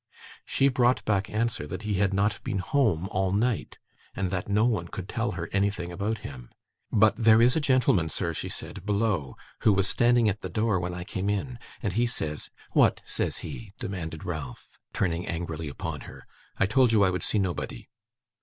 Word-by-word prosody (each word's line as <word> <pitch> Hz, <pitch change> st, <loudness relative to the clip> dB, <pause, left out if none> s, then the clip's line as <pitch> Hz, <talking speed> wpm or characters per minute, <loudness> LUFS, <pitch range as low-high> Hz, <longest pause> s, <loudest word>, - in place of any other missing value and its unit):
She 135 Hz, -, +3 dB
brought 125 Hz, -1 st, +2 dB
back 100 Hz, -2 st, +1 dB
answer 110 Hz, -8 st, -1 dB
that 95 Hz, +7 st, -6 dB
he 105 Hz, -3 st, -1 dB
had 100 Hz, -1 st, +3 dB
not 100 Hz, +2 st, 0 dB
been -, -, -2 dB
home 95 Hz, -, +1 dB
all 95 Hz, -1 st, 0 dB
night, 110 Hz, +4 st, 0 dB, 0.4 s
and 95 Hz, -2 st, -1 dB
that 90 Hz, +1 st, -3 dB
no 105 Hz, +2 st, +3 dB
one 110 Hz, -8 st, 0 dB
could 95 Hz, +1 st, -7 dB
tell 115 Hz, 0 st, -2 dB
her 85 Hz, -2 st, -4 dB
anything 100 Hz, -3 st, 0 dB
about 105 Hz, +5 st, -2 dB
him. 65 Hz, -4 st, -8 dB, 0.4 s
'But 110 Hz, +1 st, +4 dB
there 110 Hz, -1 st, +6 dB
is 120 Hz, +2 st, +5 dB
a -, -, +3 dB
gentleman, 125 Hz, -, +3 dB
sir,' 85 Hz, +1 st, -2 dB
she -, -, -3 dB
said, -, -, -6 dB
'below, 100 Hz, -, 0 dB, 0.2 s
who 105 Hz, -, +4 dB
was 95 Hz, 0 st, +2 dB
standing 120 Hz, 0 st, +4 dB
at 105 Hz, +1 st, 0 dB
the -, -, -5 dB
door 110 Hz, -3 st, +1 dB
when 90 Hz, 0 st, -3 dB
I 90 Hz, -, -5 dB
came 95 Hz, +2 st, -3 dB
in, 115 Hz, +4 st, -2 dB, 0.2 s
and 100 Hz, -4 st, -1 dB
he 120 Hz, +4 st, +2 dB
says 75 Hz, -10 st, -4 dB
' -, -, -25 dB
'What -, -, +3 dB
says -, -, -1 dB
he?' 110 Hz, -4 st, -8 dB
demanded 80 Hz, -5 st, -5 dB
Ralph, 75 Hz, -8 st, -7 dB
turning 85 Hz, -1 st, -1 dB
angrily 80 Hz, -2 st, -4 dB
upon 70 Hz, -, -5 dB
her. -, -, -11 dB, 0.3 s
'I -, -, +3 dB
told 125 Hz, +4 st, +4 dB
you 105 Hz, -3 st, +5 dB
I 95 Hz, -, +4 dB
would 90 Hz, -, -2 dB
see -, -, +1 dB
nobody. 95 Hz, -4 st, -2 dB
100 Hz, 200 wpm, -27 LUFS, 90-110 Hz, 0.4 s, there